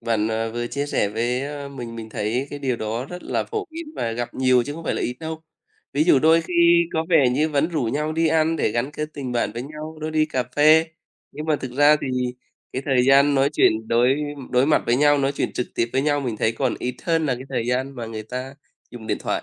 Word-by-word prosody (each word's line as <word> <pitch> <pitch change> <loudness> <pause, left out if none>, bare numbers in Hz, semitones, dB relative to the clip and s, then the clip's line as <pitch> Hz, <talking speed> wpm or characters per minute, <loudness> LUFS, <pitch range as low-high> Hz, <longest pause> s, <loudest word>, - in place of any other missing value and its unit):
Bạn, 110 -1 0
ờ, 115 0 -1
vừa 120 +1 -3
chia 140 +4 -3
sẻ 105 - 0
với 120 +4 -1 0.3
mình, 120 -4 -8
mình 110 -1 -7
thấy 110 +4 -2
cái 145 - -6
điều 130 -4 -1
đó 115 +3 -3
rất 180 0 -8
là - - -1
phổ 430 -3 -4
biến 330 +1 -7
và 115 - -2
gặp 120 +1 -4
nhiều 130 -1 +3
chứ 145 - -5
không 165 +2 -9
phải - - -1
là - - -3
ít 125 - -2
đâu. 160 0 -6 0.5
Ví 145 +2 +2
dụ 160 - +5
đôi 160 +4 +5
khi 170 0 +4
có 160 0 0
vẻ 145 -8 +5
như 150 +5 +1
vẫn 150 +1 +1
rủ 160 -5 -2
nhau 150 +7 -1
đi 165 0 +2
ăn 160 +1 +2
để - - +1
gắn 120 +5 -1
kết 150 +1 -4
tình 135 -4 -5
bạn 120 -3 0
với 120 +2 -5
nhau, 155 +3 -8
đưa 155 +1 -3
đi 155 0 +2
cà 130 -4 -1
phê. 155 +2 +6 0.5
Nhưng 150 - -6
mà 155 -1 +2
thực 130 -3 -7
ra 145 +3 +5
thì - - -3 0.6
cái 130 - -3
thời 130 -3 +3
gian 140 +2 +5
nói 135 0 +3
chuyện 110 -5 +2
đối 125 +3 +3 0.3
đối 125 +2 +3
mặt 155 - +3
với 120 - +3
nhau, 145 +1 +4
nói 140 0 +1
chuyện - - -2
trực 125 - -2
tiếp 115 - 0
với 135 - +1
nhau 145 0 +1
mình 120 -5 -3
thấy 110 - +1
còn 125 +1 -1
ít 125 0 -3
hơn 165 -2 +1
là 130 - +1
cái 125 +2 -8
thời 115 - -2
gian 130 +2 -1
mà 120 -3 -6
người 110 -1 -6
ta 125 +4 -6 0.4
dùng 115 -3 -10
điện - - -1
thoại. - - -2
135 Hz, 260 wpm, -23 LUFS, 120-155 Hz, 0.6 s, phê